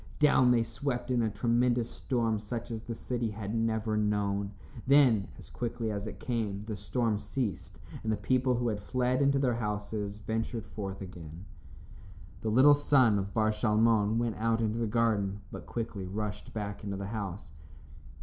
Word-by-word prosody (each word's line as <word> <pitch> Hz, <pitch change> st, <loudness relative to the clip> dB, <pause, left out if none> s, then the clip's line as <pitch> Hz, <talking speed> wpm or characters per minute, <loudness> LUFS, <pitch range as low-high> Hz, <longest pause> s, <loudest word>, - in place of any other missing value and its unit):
Down 145 Hz, -4 st, +5 dB
they 120 Hz, -2 st, +4 dB
swept 120 Hz, +2 st, -3 dB
in 125 Hz, -1 st, +2 dB
a 110 Hz, -, +1 dB
tremendous 120 Hz, +2 st, +1 dB
storm 115 Hz, -4 st, -1 dB
such 115 Hz, +3 st, -5 dB
as 110 Hz, -1 st, -4 dB
the 115 Hz, 0 st, -6 dB
city 120 Hz, -1 st, -2 dB
had 105 Hz, 0 st, -5 dB
never 110 Hz, -1 st, 0 dB
known. 100 Hz, -1 st, 0 dB, 0.4 s
Then, 130 Hz, -8 st, +5 dB
as -, -, -13 dB
quickly 115 Hz, -2 st, -3 dB
as 100 Hz, 0 st, -3 dB
it -, -, -7 dB
came, 105 Hz, -5 st, -2 dB
the 110 Hz, -1 st, -4 dB
storm 105 Hz, +1 st, 0 dB
ceased, 120 Hz, -3 st, -4 dB, 0.2 s
and 110 Hz, -, -1 dB
the 110 Hz, -, +1 dB
people 130 Hz, -1 st, +2 dB
who 120 Hz, 0 st, 0 dB
had 105 Hz, -2 st, -2 dB
fled 125 Hz, +4 st, 0 dB
into 140 Hz, 0 st, +4 dB
their 130 Hz, -3 st, +2 dB
houses, 105 Hz, -2 st, -3 dB
ventured 115 Hz, +1 st, -3 dB
forth 95 Hz, -2 st, -6 dB
again. 90 Hz, -1 st, -9 dB, 1.0 s
The 110 Hz, -, -1 dB
little 130 Hz, +6 st, +7 dB
son 130 Hz, -7 st, +4 dB
of 100 Hz, 0 st, -5 dB
Bar 110 Hz, -1 st, +3 dB
Shalmon 110 Hz, 0 st, +3 dB
went 115 Hz, -2 st, -1 dB
out 115 Hz, +1 st, +1 dB
into 110 Hz, 0 st, 0 dB
the 115 Hz, -, 0 dB
garden, 105 Hz, -3 st, +1 dB
but -, -, -8 dB
quickly 110 Hz, -5 st, -4 dB
rushed 105 Hz, +2 st, -4 dB
back 100 Hz, -2 st, -5 dB
into 100 Hz, -1 st, -3 dB
the 100 Hz, -, -4 dB
house. 100 Hz, -5 st, -5 dB
110 Hz, 175 wpm, -30 LUFS, 105-120 Hz, 1.0 s, little